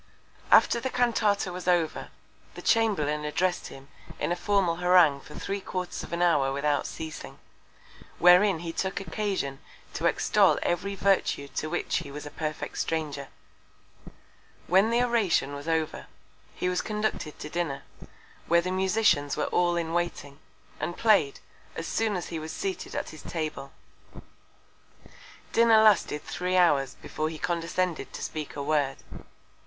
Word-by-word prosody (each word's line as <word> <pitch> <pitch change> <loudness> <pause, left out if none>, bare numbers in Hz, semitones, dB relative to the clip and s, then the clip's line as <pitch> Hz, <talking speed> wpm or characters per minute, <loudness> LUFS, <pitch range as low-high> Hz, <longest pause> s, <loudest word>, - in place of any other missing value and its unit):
_ - - -33 0.5
After 235 - +6
the 260 - -2
Cantata 225 -6 +1
was 180 0 -7
over, 175 -3 +1 0.5
the - - -9
Chamberlain 155 -10 +2
address'd 175 +5 -1
him 135 0 -12 0.3
in - - -1
a - - +2
formal 180 -2 +1
Harangue 180 -5 +5
for 150 - -13
three 200 0 -4
Quarters 185 -1 -4
of - - -9
an 170 +1 0
Hour 145 -6 +3
without 145 +1 0
ceasing; 160 -1 -7 0.8
wherein 180 0 +5
he 165 - -4
took 190 +2 -2
Occasion 195 -9 -3 0.3
to - - 0
extol - - +3
every 190 +3 -1
Virtue 195 -7 +1
to 155 - -4
which 175 - -1
he 160 -4 -5
was 145 +1 -8
a 145 - -8
perfect 155 -1 -4
Stranger; 150 -4 -2 1.4
when 190 +5 +4
the 235 +1 +2
Oration 210 - +1
was 145 +2 -7
over, 160 -1 -1 0.5
he - - -2
was 180 0 0
conducted 210 -7 -3
to - - -7
Dinner, 155 -4 -3 0.6
where 170 0 +4
the 185 +1 -3
Musicians 185 -6 +2
were - - -2
all 175 -1 +2
in 165 -1 -2
waiting, 165 -5 -3 0.4
and 175 - -3
play'd, 210 -11 +3 0.4
as 165 - -4
soon 220 +2 0
as 180 - -4
he 165 - -4
was 155 0 -6
seated 190 +2 -4
at - - -3
his 155 - -11
Table. 155 -4 -5 1.8
Dinner 230 -1 +6
lasted 190 -8 +3
three 180 +3 -2
Hours 145 -7 +3
before 155 0 -4
he 160 - -7
condescended 170 +2 -2
to - - -6
speak 155 -2 -5
a 140 - -4
Word. 145 -2 0
170 Hz, 155 wpm, -27 LUFS, 150-190 Hz, 1.8 s, After